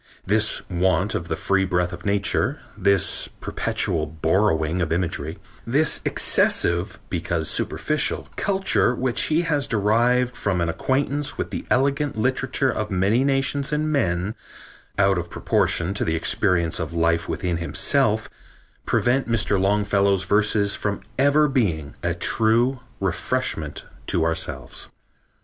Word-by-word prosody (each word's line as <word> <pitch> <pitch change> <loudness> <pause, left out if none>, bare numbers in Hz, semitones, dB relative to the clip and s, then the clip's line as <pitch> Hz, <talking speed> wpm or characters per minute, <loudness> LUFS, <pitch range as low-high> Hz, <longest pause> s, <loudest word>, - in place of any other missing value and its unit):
This 110 +2 +1
want 90 -1 +1
of - - -3
the - - -2
free 100 -1 +1
breath 90 -1 0
of 85 +3 -7
nature, 100 0 0 0.2
this 100 -3 +2
perpetual 80 -2 -1
borrowing 80 +1 +1
of 80 - -1
imagery, 80 -2 -2 0.3
this 140 +6 +1
excessive, 85 +2 +1
because 85 -2 -2
superficial, 150 -1 0
culture 190 -10 +1
which 125 0 0
he 160 +2 +2
has 150 -4 0
derived 120 +4 +2
from 95 -3 -1
an 85 -1 0
acquaintance 140 - -1
with - - -4
the - - -5
elegant 140 +2 +1
literature 130 +2 0
of 105 -1 -3
many 100 +7 +2
nations 135 +1 +1
and 155 +1 0
men, 95 - 0 0.6
out 95 -2 +3
of 85 0 -6
proportion 85 +2 0
to 105 - -1
the 80 - 0
experience 85 0 +1
of 80 0 -4
life 85 0 +1
within 90 -2 -2
himself, 105 - +1 0.6
prevent 125 0 +1
Mr. 105 -4 +1
Longfellow's 100 -1 +2
verses 105 0 +2
from 100 -1 -2 0.2
ever 145 +2 +4
being 90 - -1
a 85 -1 -1
true 115 +8 +2 0.2
refreshment 95 - -2 0.2
to 80 - +1
ourselves." 80 -7 -3
100 Hz, 130 wpm, -23 LUFS, 85-130 Hz, 0.6 s, ever